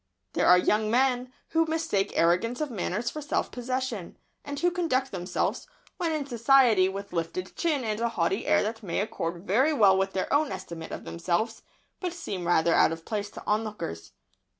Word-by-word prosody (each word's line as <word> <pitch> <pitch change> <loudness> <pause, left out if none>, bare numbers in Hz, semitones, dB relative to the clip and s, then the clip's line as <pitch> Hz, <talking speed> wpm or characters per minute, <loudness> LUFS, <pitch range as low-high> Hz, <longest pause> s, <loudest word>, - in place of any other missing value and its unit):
There - - +2
are 180 - +8
young 215 +4 +2
men 250 +1 +2 0.2
who 325 0 +2
mistake 315 -12 0
arrogance 180 +9 +2
of 305 -3 -2
manners 215 +2 -2
for 305 - -6
self 295 - -1
possession, 250 -6 -4 0.3
and 285 -1 -5
who 350 0 +2
conduct 270 -7 0
themselves, 180 - -2 0.3
when 335 -2 0
in 305 -3 -1
society 235 -5 +4
with 195 -1 -7
lifted 170 +2 -3
chin 305 -6 0
and 215 -1 -2
a 235 0 +1
haughty 195 +1 -1
air - - +4
that 225 +2 -3
may 180 -6 -2
accord 175 -3 -3
very 260 +11 +3
well 205 -8 +5
with 195 0 0
their 190 - -1
own 295 0 +2
estimate 165 -1 -7
of - - -6
themselves, 180 +7 -2 0.4
but 360 -2 -3
seem 195 - -5
rather 170 -1 +3
out - - +5
of 165 0 -6
place 205 -2 -3
to - - -10
onlookers. 210 - -3
220 Hz, 185 wpm, -27 LUFS, 185-265 Hz, 0.4 s, are